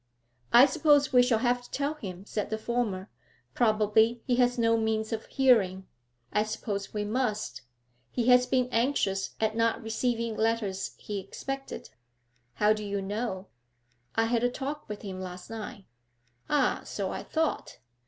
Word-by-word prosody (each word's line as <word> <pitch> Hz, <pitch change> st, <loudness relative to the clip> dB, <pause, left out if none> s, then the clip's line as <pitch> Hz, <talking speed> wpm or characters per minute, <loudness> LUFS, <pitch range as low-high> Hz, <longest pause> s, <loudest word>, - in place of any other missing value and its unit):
'I 245 Hz, +3 st, +9 dB
suppose 290 Hz, 0 st, +3 dB
we 250 Hz, -, +8 dB
shall 245 Hz, -2 st, +3 dB
have 245 Hz, 0 st, +2 dB
to 245 Hz, -, -15 dB
tell 285 Hz, +2 st, -1 dB
him,' 195 Hz, -, -8 dB
said 210 Hz, -1 st, -3 dB
the 220 Hz, -, -1 dB
former. 220 Hz, -4 st, -2 dB, 0.5 s
'Probably 220 Hz, +1 st, +3 dB
he 245 Hz, -2 st, +1 dB
has 245 Hz, 0 st, +3 dB
no 230 Hz, -1 st, +3 dB
means 220 Hz, 0 st, 0 dB
of 220 Hz, -, -4 dB
hearing.' 200 Hz, -8 st, +3 dB, 0.5 s
'I 210 Hz, -, +3 dB
suppose 210 Hz, -2 st, -3 dB
we 210 Hz, -1 st, -2 dB
must. 215 Hz, -, -2 dB, 0.5 s
He 235 Hz, -, -1 dB
has 250 Hz, 0 st, +6 dB
been 255 Hz, -1 st, +2 dB
anxious 225 Hz, -6 st, 0 dB
at 220 Hz, 0 st, 0 dB
not 230 Hz, 0 st, +1 dB
receiving 230 Hz, 0 st, -1 dB
letters 220 Hz, -4 st, -1 dB
he 205 Hz, -1 st, -5 dB
expected.' 270 Hz, +8 st, -6 dB, 0.6 s
'How 210 Hz, +1 st, +4 dB
do 215 Hz, 0 st, -5 dB
you 200 Hz, -1 st, -2 dB
know?' 195 Hz, -1 st, -3 dB, 0.7 s
'I 225 Hz, -, +3 dB
had 235 Hz, 0 st, +1 dB
a 245 Hz, -, +3 dB
talk 280 Hz, +3 st, -5 dB
with 210 Hz, -1 st, -6 dB
him 190 Hz, -2 st, -6 dB
last 180 Hz, +2 st, -8 dB
night.' 210 Hz, -3 st, -7 dB, 0.6 s
'Ah, 285 Hz, -4 st, +2 dB
so -, -, -3 dB
I -, -, -4 dB
thought. 320 Hz, -1 st, -2 dB
225 Hz, 160 wpm, -28 LUFS, 205-245 Hz, 0.7 s, I